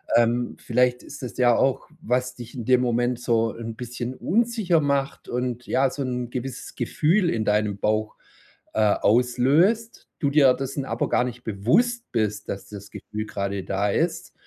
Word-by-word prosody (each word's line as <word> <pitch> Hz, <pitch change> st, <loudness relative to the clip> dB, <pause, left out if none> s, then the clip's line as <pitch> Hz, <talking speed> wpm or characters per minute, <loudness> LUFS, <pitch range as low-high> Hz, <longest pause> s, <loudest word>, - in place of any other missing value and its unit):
Ähm, 120 Hz, +1 st, +2 dB
vielleicht 125 Hz, +1 st, +1 dB
ist 145 Hz, -, -10 dB
das 120 Hz, -, -6 dB
ja 120 Hz, -2 st, +4 dB
auch, 135 Hz, +2 st, +1 dB
was 125 Hz, +1 st, -1 dB
dich 120 Hz, -1 st, -10 dB
in 120 Hz, -4 st, -5 dB
dem 125 Hz, -1 st, +4 dB
Moment 120 Hz, 0 st, 0 dB
so 115 Hz, -2 st, +1 dB
'n 115 Hz, -1 st, -6 dB
bisschen 125 Hz, +1 st, -5 dB
unsicher 215 Hz, -, +1 dB
macht 140 Hz, -1 st, -1 dB
und, 125 Hz, -1 st, -3 dB
ja, 135 Hz, 0 st, +2 dB
so 140 Hz, +1 st, -4 dB
'n 125 Hz, -1 st, -3 dB
gewisses 130 Hz, +1 st, -6 dB
Gefühl 170 Hz, +3 st, +1 dB
in 110 Hz, -1 st, -1 dB
deinem 105 Hz, -1 st, +1 dB
Bauch, 110 Hz, 0 st, 0 dB, 0.6 s
äh, -, -, -1 dB, 0.2 s
auslöst, 135 Hz, -, +2 dB
du 140 Hz, -, +1 dB
dir 140 Hz, -3 st, +6 dB
dessen 135 Hz, 0 st, -4 dB
aber 115 Hz, -1 st, -2 dB
gar 125 Hz, -, +3 dB
nicht 125 Hz, 0 st, -7 dB
bewusst 220 Hz, -, +1 dB
bist, 105 Hz, -2 st, -1 dB
dass 95 Hz, -1 st, -5 dB
das 100 Hz, -1 st, -9 dB
Gefühl 105 Hz, 0 st, -6 dB
gerade 100 Hz, -2 st, -3 dB
da 100 Hz, +1 st, 0 dB
ist -, -, -1 dB
125 Hz, 170 wpm, -24 LUFS, 115-135 Hz, 0.6 s, dir